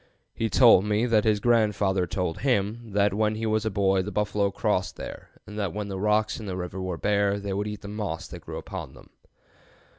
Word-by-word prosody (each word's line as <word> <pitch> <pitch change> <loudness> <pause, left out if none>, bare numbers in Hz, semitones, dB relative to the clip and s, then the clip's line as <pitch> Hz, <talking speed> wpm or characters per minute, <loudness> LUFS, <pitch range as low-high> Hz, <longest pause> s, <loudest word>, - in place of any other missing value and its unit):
He 115 - -1
told 115 -7 +6
me 105 +2 +1
that 115 -3 +2
his 105 -2 +3
grandfather 105 -5 +2
told 90 -2 -2
him 115 -3 -1
that 100 0 +3
when 105 +1 +1
he 110 +1 -3
was 110 0 0
a - - +2
boy 95 -2 +2
the 100 +3 -5
buffalo 105 -1 0
crossed 100 -2 -1
there, - - -8 0.2
and 105 +1 -7
that 100 -3 -2
when 105 -1 -3
the 95 -1 -4
rocks 105 +2 +1
in 110 - -7
the 95 -1 -3
river 90 +1 -5
were 90 -2 -3
bare 100 +1 +1
they 100 -1 -4
would 100 +2 -2
eat 105 -1 -6
the 100 - -9
moss 100 -6 -4
that - - -9
grew - - -7
upon - - -7
them." - - -17
105 Hz, 220 wpm, -26 LUFS, 95-110 Hz, 0.2 s, told